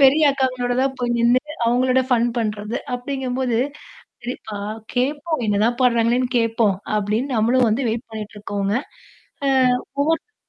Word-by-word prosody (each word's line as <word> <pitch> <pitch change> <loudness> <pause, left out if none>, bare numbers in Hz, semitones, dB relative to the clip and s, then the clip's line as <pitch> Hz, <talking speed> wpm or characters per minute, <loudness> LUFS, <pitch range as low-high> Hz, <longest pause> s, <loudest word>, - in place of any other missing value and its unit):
பெரிய 275 +3 +6
அக்காங்களோட 255 -2 0
தான் 265 -1 0
போய் 240 -1 0
நின்னுட்டு 255 +6 +2
அவங்களோட 255 +2 +3
ஃபன் 240 -2 +3
பண்றது. 215 0 -2 0.2
அப்படிங்கும்போது, 255 -2 -2 0.6
சேரிப்பா 240 -3 -6 0.4
கேப்போம் 290 +2 -1
என்னதான் 215 +3 +1
பான்றாங்களேன்னு 240 +1 +3
கேப்போம், 225 -3 +2 0.2
அப்படின்னு 210 +6 -1
நம்மளும் 235 +2 +3
வந்து 240 +5 0
வெயிட் 230 +3 -3
பண்ணிட்டு 215 -1 -7
இருக்கோம்ங்க, 205 +1 -1 0.7
ஆ - - +3 0.5
ஒவ்வொருத்தவங்களும் 325 +9 0
245 Hz, 125 wpm, -21 LUFS, 225-260 Hz, 0.7 s, பெரிய